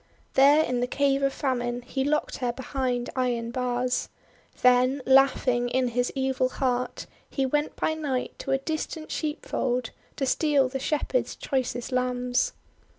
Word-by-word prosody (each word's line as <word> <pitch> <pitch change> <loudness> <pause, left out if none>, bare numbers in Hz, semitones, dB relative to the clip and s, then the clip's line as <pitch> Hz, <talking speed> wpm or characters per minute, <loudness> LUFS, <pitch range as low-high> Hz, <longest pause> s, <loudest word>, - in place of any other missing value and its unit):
There 285 +3 +6
in 250 -4 -1
the 245 - 0
Cave 275 +1 +1
of 275 0 +2
Famine 245 -3 -2
he 265 +2 -2
locked 300 +2 0
her 245 -2 -1
behind 250 -1 -2
iron 240 -3 -1
bars. 250 0 -1 0.5
Then, 250 +2 +4
laughing 265 -2 +4
in 255 0 +1
his 245 +1 0
evil 265 -1 +1
heart, 250 -2 -2 0.2
he 270 - 0
went 295 +3 0
by 315 - 0
night 285 -5 -2
to - - -6
a 270 - +3
distant 310 +2 -4
sheepf 300 -2 -4
old 250 -2 0 0.2
to 270 - -1
steal 280 -1 +2
the 270 +1 -3
Shepherds' 300 - -1
choicest 255 -2 -2
lambs. 250 - 0
260 Hz, 155 wpm, -26 LUFS, 245-275 Hz, 0.5 s, There